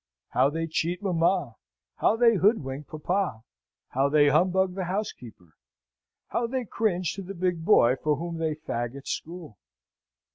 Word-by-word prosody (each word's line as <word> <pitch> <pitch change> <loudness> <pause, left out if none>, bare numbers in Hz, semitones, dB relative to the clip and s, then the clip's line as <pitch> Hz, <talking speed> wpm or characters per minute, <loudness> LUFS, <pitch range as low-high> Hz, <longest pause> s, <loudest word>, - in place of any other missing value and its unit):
How 135 - +3
they 165 +2 -2
cheat 170 +4 -2
mamma! 170 - +1 0.4
how - - +3
they 230 0 +5
hoodwink 150 - +1
papa! 155 - -2 0.5
how 135 +2 +1
they 145 0 +5
humbug 185 +5 +2
the 190 -1 -3
housekeeper! 125 - -6 0.7
how 235 - -1
they 255 0 -2
cringe 185 -6 -1
to 195 - -6
the 195 +1 -8
big 175 -2 -1
boy 130 - +5
for 150 +1 0
whom 165 +2 -5
they 160 -2 -1
fag 120 -5 -4
at 140 - -10
school! 165 - -6
170 Hz, 150 wpm, -27 LUFS, 145-190 Hz, 0.7 s, they